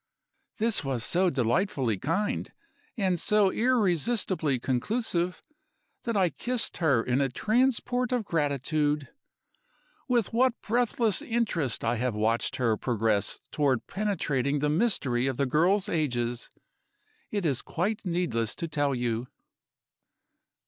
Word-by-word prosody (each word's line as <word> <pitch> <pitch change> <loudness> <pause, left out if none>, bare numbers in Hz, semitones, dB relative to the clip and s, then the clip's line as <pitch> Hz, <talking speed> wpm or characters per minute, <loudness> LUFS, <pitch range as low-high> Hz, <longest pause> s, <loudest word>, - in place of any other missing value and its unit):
This 225 -4 +1
was 130 -4 -1
so 185 +4 +2
delightfully 130 - 0
kind, 175 - -1 0.5
and 185 -4 +1
so 205 +1 +3
irresistibly 200 - +1
conclusive, 175 - -1 0.6
that 230 -3 0
I 185 -4 +3
kissed 245 -1 -1
her 140 -9 +2
in 130 +2 +1
a 135 - +1
transport 245 - +1
of 245 -4 0
gratitude. 150 -2 0 1.0
With 240 -6 +1
what 250 +1 +2
breathless 230 -2 +1
interest 195 - -1
I 115 +1 +1
have 125 -1 -1
watched 110 +2 0
her 115 -4 +1
progress 110 -4 0
toward 140 -5 +1
penetrating 150 -9 -1
the 145 +1 0
mystery 145 - +1
of 130 -2 -2
the 140 - +2
girls' 180 - +2
ages, 120 - -1 0.8
it 205 -4 -2
is 135 -6 +1
quite 200 +6 -2
needless 170 - -1
to 170 - -4
tell 145 -3 0
you." 120 0 -2
160 Hz, 120 wpm, -28 LUFS, 125-210 Hz, 1.0 s, so